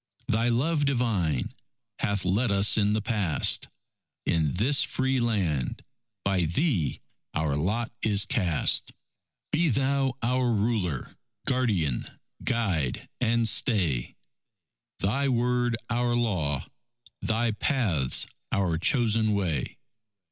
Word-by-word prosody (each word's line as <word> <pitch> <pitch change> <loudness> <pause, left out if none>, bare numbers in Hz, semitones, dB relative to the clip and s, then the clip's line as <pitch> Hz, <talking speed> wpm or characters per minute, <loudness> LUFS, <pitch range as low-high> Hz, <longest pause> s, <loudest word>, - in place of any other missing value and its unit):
Thy 115 +2 +1
love 145 +5 +1
divine, 110 - 0 0.5
hath 100 -2 0
led 105 +7 +1
us 100 +1 +4
in 105 -1 +2
the 110 -1 -1
past; 105 - +2 0.6
In 80 -2 +1
this 130 +9 +3
Free 130 -1 0
Land, 95 - -1 0.4
by 95 -3 +2
Thee 90 - 0 0.3
our 75 -2 0
lot 105 - -1
is 105 -2 +2
cast; 90 - +1 0.6
Be 165 +1 +2
Thou 135 0 +1
our 125 +1 +1
ruler, 100 - -1 0.3
guardian, 105 - 0 0.4
guide, 95 - -1
and 115 -1 +2
stay, 90 - +1 0.8
Thy 135 +8 0
Word 120 -1 +1
our 120 0 0
law, 90 - 0 0.6
Thy 115 +1 0
paths 105 - +1 0.3
our 90 -5 +1
chosen 110 0 +2
way. 85 -10 -2
110 Hz, 105 wpm, -27 LUFS, 90-120 Hz, 0.8 s, us